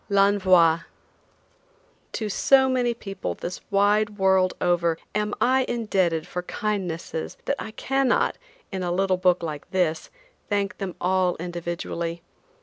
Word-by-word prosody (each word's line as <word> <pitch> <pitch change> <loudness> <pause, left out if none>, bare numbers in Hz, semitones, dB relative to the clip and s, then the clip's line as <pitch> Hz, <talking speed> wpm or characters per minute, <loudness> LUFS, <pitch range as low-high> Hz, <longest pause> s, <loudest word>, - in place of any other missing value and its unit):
L'ENVOI. 190 -5 +4 1.3
To 220 - -2
so 265 +6 +4
many 250 -2 +1
people 195 - -5
this 180 +1 -6
wide 205 +1 +2
world 190 -1 +3
over 170 -2 +1 0.2
am 210 0 -1
I 260 +1 +3
indebted 190 -9 0
for 180 - -4
kindnesses 180 -5 -3
that 280 - 0
I - - -5
cannot, 270 +3 +1 0.3
in 190 - -3
a 175 -1 -1
little 190 +1 +1
book 180 -1 +2
like 150 -3 -5
this, 170 -4 0 0.4
thank 200 -1 -1
them 195 -3 -4
all 185 0 +1
individually. 170 -1 -4
190 Hz, 130 wpm, -25 LUFS, 175-210 Hz, 1.3 s, L'ENVOI